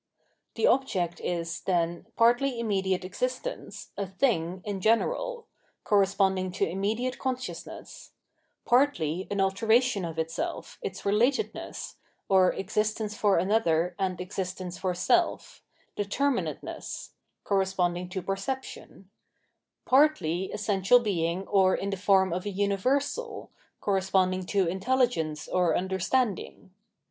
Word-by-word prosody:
The - - +1
object 185 - +1
is, 170 -1 -3
then, 175 0 -1
partly 240 +2 +3
immediate 190 -4 0
existence, - - -4
a 200 - -3
thing 185 -4 0
in 200 -2 -3
general 475 - +1 0.2
— - - -42
correspon^ng 195 -2 +2
to - - +1
immediate 220 +8 -2
con 260 -1 0
sciousness 255 0 -9 0.6
partly 190 - +2
an 200 - -2
alteration 220 +3 +2
of 165 -1 -5
itself, 165 - -4
its 425 - -5
relatedness, 240 - -1 0.3
(or 190 -2 +5
existence 210 +2 -1
for 205 -2 +3
anotherand 180 -1 +1
existence 185 -1 -5
for 185 -2 -1
selE),deiermm 255 - -1
ateness - - -7 0.2
— - - -52
corresponding 180 -3 0
to 190 -1 -4
perception; 195 -1 -5 0.7
partly 255 - +3
essential 210 +2 +3
being 185 -4 -1
or 190 -2 +4
in 200 - -3
the - - -1
form 190 -2 +3
of 180 +3 -3
a - - 0
universal 260 - -1
— - - -41
corresponding 185 -2 +1
to 195 -2 +2
intelligence 190 - 0
or 180 -3 +2
understanding. 190 +2 -1
195 Hz, 115 wpm, -28 LUFS, 185-240 Hz, 0.7 s, or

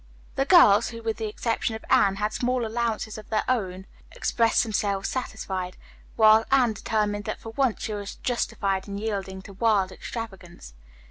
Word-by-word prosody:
The 270 - 0
girls, 275 - +6
who, 230 0 -9
with 225 -1 -2
the 220 - -3
exception 225 +1 -2
of 220 - -9
Anne, 195 -1 +4
had 210 +2 -2
small 250 0 0
allowances 220 -1 -2
of 215 - -13
their 215 -1 +1
own, 190 -7 -1 0.3
expressed 230 -1 +2
themselves 200 -3 -1
satisfied; 190 -8 -4 0.4
while 220 0 +6
Anne 255 -4 +4
determined 210 0 -1
that 215 - -4
for 225 - -9
once 245 0 0
she 215 - -3
was 205 -1 -6
justified 195 -5 -2
in 200 0 -5
yielding 195 -3 -4
to 200 - -11
wild 200 -2 +2
extravagance. 190 - -8
215 Hz, 165 wpm, -25 LUFS, 200-230 Hz, 0.4 s, girls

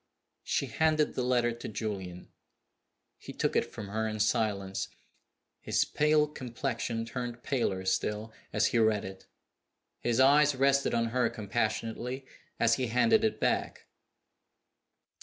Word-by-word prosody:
_" - - -49 0.4
She - - 0
handed 155 -1 +1
the - - -2
letter 120 -1 +2
to 115 - -7
Julian. 100 -5 -5 0.9
He - - -9
took - - -1
it - - +1
from 105 -2 -7
her 110 +2 -1
in 110 0 -4
silence. 105 -3 0 0.7
His - - +1
pale 150 0 +3
complexion 120 -4 -3
turned 120 0 -5
paler 95 -9 -1
still 105 +3 -1 0.2
as 105 +1 +2
he 120 - +4
read 110 -2 +2
it. 95 0 -10 0.7
His 120 0 0
eyes 145 +2 +5
rested 140 0 +2
on 115 0 +1
her 125 +1 +1
compassionately 115 +4 -3 0.3
as 115 0 +4
he 130 -2 -1
handed 220 - +3
it 220 -1 0
back. - - -1
115 Hz, 140 wpm, -30 LUFS, 110-130 Hz, 0.9 s, eyes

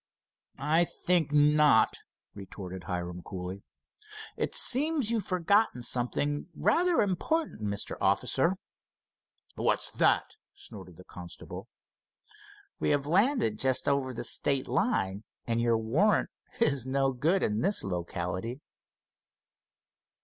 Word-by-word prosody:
"I 155 +5 +2
think 170 -2 0
not," 150 -5 +4 0.3
retorted 95 -2 -9
Hiram, 90 0 -4
coolly. 95 +1 -7 0.7
"It - - -3
seems 280 -3 +2
you've 225 -5 -1
forgotten 185 - +1
something 145 +6 -1
rather 335 - +2
important, 245 - -2
Mr. 100 -1 -3
Officer." 130 - +1 1.0
"What's - - -1
that?" - - +2 0.3
snorted - - -12
the - - -13
constable. - - -10 1.1
"We - - 0
have 145 -1 +1
landed 180 - +2
just 130 -1 +2
over 140 -2 +1
the 120 - -6
state 135 -2 0
line 120 - 0 0.2
and 115 0 0
your 115 -1 +2
warrant 140 - +1 0.3
is 140 - +2
no 135 +1 0
good 160 +10 +1
in 105 +1 0
this 200 +3 +2
locality." 90 +5 -4
140 Hz, 110 wpm, -29 LUFS, -, 1.1 s, not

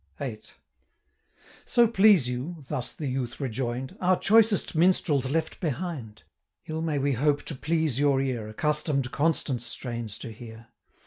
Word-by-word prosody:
VIII. - - -5 1.2
'So 240 -1 +4
please 200 - +5
you,' 130 +8 -4
thus 135 -5 -2
the 155 - -6
youth 130 -3 -3
rejoin'd, 130 -1 -3
'Our 185 0 +3
choicest 220 -1 +4
minstrel's 160 -5 +3
left 160 +2 -2
behind. 145 -8 -4 0.4
115 155 - -6
Ill 160 - -2
may 160 -3 -1
we 140 +1 +1
hope 145 +3 +1
to - - -5
please 155 -1 0
your 140 -2 +3
ear, 125 -5 -2
Accustom'd 145 +1 -1
Constant's 140 -6 0
strains 120 -3 -5
to 115 - -8
hear. 115 0 -12
140 Hz, 145 wpm, -27 LUFS, 125-165 Hz, 1.2 s, please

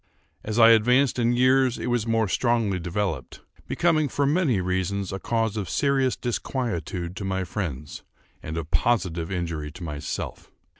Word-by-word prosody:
As 110 +1 -3
I 115 -1 +8
advanced 125 +4 +4
in 120 0 +2
years 130 0 +3
it - - -5
was 120 -2 0
more 115 -1 +2
strongly 115 -3 +1
developed; 85 -6 -3 0.3
becoming, 155 -4 +2
for 145 - 0
many 145 - +2
reasons, 95 +1 -1
a 95 - -3
cause 115 -1 -1
of 100 -3 -3
serious 135 -2 +1
disquietude 100 -8 -3
to - - -4
my 95 -1 -1
friends, 80 -7 -5 0.4
and 80 +1 -5
of 80 -1 -5
positive 90 -8 +1
injury 85 -5 -3
to 90 - -9
myself. 75 -3 -5
105 Hz, 155 wpm, -25 LUFS, 90-125 Hz, 0.4 s, I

